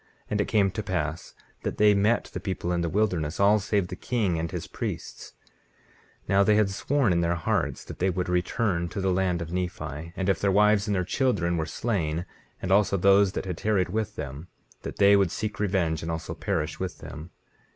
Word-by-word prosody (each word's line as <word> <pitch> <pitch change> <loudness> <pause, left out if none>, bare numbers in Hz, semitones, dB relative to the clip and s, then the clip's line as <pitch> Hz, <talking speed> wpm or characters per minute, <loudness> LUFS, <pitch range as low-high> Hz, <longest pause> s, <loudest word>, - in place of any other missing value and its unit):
And 105 0 +1
it - - -1
came 100 -4 +2
to 95 - -3
pass 85 -5 -3 0.3
that - - -3
they 105 0 +6
met 105 +4 +1
the - - -3
people 90 -3 -3
in 85 -1 0
the 85 - -1
wilderness, 90 -6 0
all 100 +2 +5
save 100 -2 0
the - - -5
king 100 -9 -1
and 85 +1 -2
his - - -5
priests. - - -6 0.9
19:19 - - -25
Now 100 0 +5
they 105 +1 +4
had 105 -2 +3
sworn 130 0 +1
in 85 - +2
their 85 0 +1
hearts 80 - -1
that - - -9
they 95 - +2
would 90 0 -2
return 90 0 0
to - - -5
the 95 -1 +1
land 90 -2 0
of 85 +1 -8
Nephi, 85 -3 -4
and 95 - -2
if 95 - +1
their 100 - +2
wives 105 +1 +4
and 105 - +1
their 90 - +1
children 90 -6 +1
were 80 -2 -1
slain, 85 -4 -2 0.4
and 95 - -2
also 100 0 +4
those 100 +1 +4
that - - -3
had 90 -3 -4
tarried 100 -4 +1
with 110 +2 -2
them, 70 +5 -6 0.3
that - - -7
they 100 0 +6
would 100 -3 +3
seek 105 +4 -4
revenge, 90 -6 0
and 80 - -5
also 80 0 -4
perish 80 -3 -2
with 95 -1 -4
them. 80 +2 -9
95 Hz, 215 wpm, -26 LUFS, 85-100 Hz, 0.9 s, they